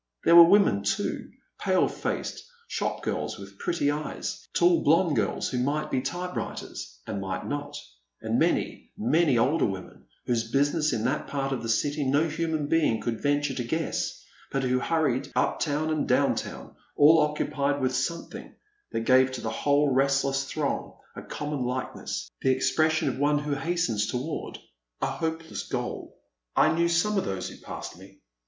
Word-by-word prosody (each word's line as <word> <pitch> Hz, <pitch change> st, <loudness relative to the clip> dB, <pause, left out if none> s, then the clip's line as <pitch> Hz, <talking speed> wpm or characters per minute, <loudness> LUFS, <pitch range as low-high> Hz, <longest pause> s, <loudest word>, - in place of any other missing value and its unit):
There 170 Hz, -, +6 dB
were 170 Hz, 0 st, +10 dB
women 195 Hz, -, +5 dB
too, 100 Hz, 0 st, -2 dB, 0.3 s
pale -, -, +2 dB
faced -, -, -4 dB, 0.2 s
shop -, -, -3 dB
girls -, -, -2 dB
with 100 Hz, 0 st, -12 dB
pretty 155 Hz, -4 st, 0 dB
eyes, 150 Hz, +1 st, -5 dB
tall 175 Hz, 0 st, +4 dB
blonde 160 Hz, +1 st, +4 dB
girls -, -, 0 dB
who 125 Hz, -, -2 dB
might 145 Hz, +4 st, -1 dB
be 130 Hz, -, +1 dB
t3rpewriters 175 Hz, -, -5 dB
and 100 Hz, -, -4 dB
might 95 Hz, -1 st, -4 dB
not, 145 Hz, 0 st, -4 dB, 0.4 s
and -, -, 0 dB
many, -, -, 0 dB
many 145 Hz, +3 st, +3 dB
older 140 Hz, +8 st, +3 dB
women 95 Hz, -2 st, -8 dB, 0.2 s
whose 115 Hz, -2 st, 0 dB
business 145 Hz, +3 st, +2 dB
in 115 Hz, -3 st, -1 dB
that 130 Hz, +5 st, -1 dB
part 135 Hz, -1 st, -2 dB
of 135 Hz, -, -2 dB
the 115 Hz, -, -4 dB
city 145 Hz, +6 st, +1 dB
no 145 Hz, +4 st, +2 dB
human 160 Hz, -1 st, -1 dB
being 150 Hz, -7 st, +2 dB
could 115 Hz, -2 st, -3 dB
venture 145 Hz, 0 st, +1 dB
to 125 Hz, -, -3 dB
guess, 160 Hz, +7 st, -2 dB, 0.3 s
but 135 Hz, -1 st, -1 dB
who 125 Hz, 0 st, +2 dB
hurried 150 Hz, -3 st, 0 dB
up 125 Hz, -, +1 dB
town 155 Hz, +1 st, 0 dB
and 155 Hz, -1 st, 0 dB
down -, -, +3 dB
town, -, -, -6 dB, 0.2 s
all 155 Hz, +3 st, +7 dB
occupied 150 Hz, -1 st, 0 dB
with 130 Hz, -1 st, 0 dB
something 165 Hz, +6 st, -4 dB, 0.4 s
that 115 Hz, -, -1 dB
gave 130 Hz, +2 st, +4 dB
to 130 Hz, -, -5 dB
the 110 Hz, -, -3 dB
whole 145 Hz, +3 st, +2 dB
restless 135 Hz, 0 st, +2 dB
throng 145 Hz, +1 st, -3 dB, 0.2 s
a -, -, -6 dB
common 150 Hz, -2 st, -4 dB
likeness 125 Hz, +1 st, -4 dB
— -, -, -52 dB
the 130 Hz, -, +2 dB
expression 155 Hz, +4 st, +2 dB
of -, -, -2 dB
one 145 Hz, +1 st, +3 dB
who 145 Hz, 0 st, -2 dB
hastens 140 Hz, -9 st, 0 dB
toward 135 Hz, +6 st, -4 dB, 0.4 s
a -, -, 0 dB
hopeless 160 Hz, 0 st, -3 dB
goal. -, -, -4 dB, 0.4 s
I 155 Hz, -, +5 dB
knew 170 Hz, +1 st, +2 dB
some 195 Hz, +5 st, +2 dB
of -, -, -3 dB
those 95 Hz, -1 st, -3 dB
who -, -, -11 dB
passed 85 Hz, -, -8 dB
me. 95 Hz, +1 st, -15 dB
145 Hz, 175 wpm, -27 LUFS, 125-160 Hz, 0.4 s, were